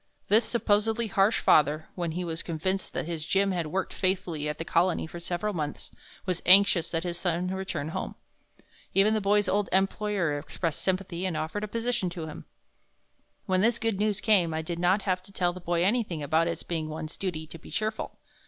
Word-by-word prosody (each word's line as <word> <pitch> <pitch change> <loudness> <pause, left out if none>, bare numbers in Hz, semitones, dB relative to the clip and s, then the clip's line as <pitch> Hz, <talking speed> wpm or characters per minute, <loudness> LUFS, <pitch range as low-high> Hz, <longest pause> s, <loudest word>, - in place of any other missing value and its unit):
This 220 +3 +5
supposedly 225 0 +1
harsh 200 +1 +2
father, 150 +1 +4
when 170 -3 -3
he 180 +2 -2
was 165 -1 -2
convinced 185 +4 -2
that - - -2
his 165 -2 -3
Jim 195 +4 +2
had 175 -4 -1
worked 190 +5 -2
faithfully 185 -6 -1
at 150 - -3
the 165 - -4
Colony 175 +1 +2
for 170 +2 -8
several 175 +5 -2
months, 150 -4 -4 0.3
was 180 -2 -1
anxious 185 -3 +6
that 165 -1 -1
his 175 -1 -3
son 180 0 0
return 190 -5 -3
home. - - -4 0.8
Even 200 +3 +5
the 215 - +1
boy's 205 0 +3
old 200 +1 +1
employer 195 -4 +1
expressed 160 +2 -3
sympathy 185 -2 -1
and 180 -4 -1
offered 160 +7 -3
a - - -2
position 230 -3 -1
to 170 -2 -6
him. 155 - -8 1.0
When 185 0 +2
this 230 +2 +3
good 225 -4 -1
news 210 -1 +1
came 180 -7 +3
I 160 - -2
did 170 +1 -4
not 185 +3 +3
have 185 -2 0
to 195 +2 -16
tell 175 -2 0
the 185 - -9
boy 175 0 0
anything 195 -6 0
about 160 +3 +2
its 170 - -3
being 160 -2 -3
one's 155 0 -6
duty 170 -5 -3
to 165 +1 -11
be - - -13
cheerful. 215 0 -3
180 Hz, 200 wpm, -28 LUFS, 165-200 Hz, 1.0 s, anxious